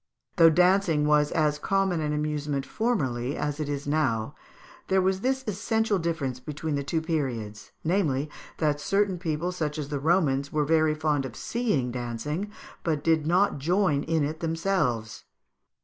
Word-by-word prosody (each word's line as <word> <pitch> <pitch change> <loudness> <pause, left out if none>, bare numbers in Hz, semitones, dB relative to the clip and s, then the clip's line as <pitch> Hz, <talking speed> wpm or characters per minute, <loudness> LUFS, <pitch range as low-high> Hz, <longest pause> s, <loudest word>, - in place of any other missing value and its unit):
Though 165 -2 +8
dancing 180 -2 +3
was 150 0 +3
as 150 -2 +1
common 195 -1 +1
an 150 -1 -1
amusement 150 -2 -2
formerly 135 - -1
as 145 0 -2
it 150 -2 -2
is 145 -1 -3
now, 130 -7 0 0.5
there 190 - +3
was 190 0 +1
this 265 +2 0
essential 220 0 0
difference 160 -7 -2
between 150 +4 -4
the 140 - 0
two 160 +3 -1
periods, 120 -10 -3
namely, 155 -5 +1 0.3
that 150 -2 0
certain 195 +1 +1
people, 165 0 -2
such 155 -4 -3
as 145 -2 -4
the 145 -2 -2
Romans, 145 -3 +2
were 150 -1 +1
very 155 0 +3
fond 150 -2 0
of 130 -3 -7
seeing 210 - -1
dancing, 125 - -3 0.3
but 155 -3 -1
did 160 -2 +2
not 180 -2 +2
join 170 -1 +2
in 160 0 0
it 155 +2 -3
themselves. 165 - -1
155 Hz, 160 wpm, -27 LUFS, 145-180 Hz, 0.5 s, Though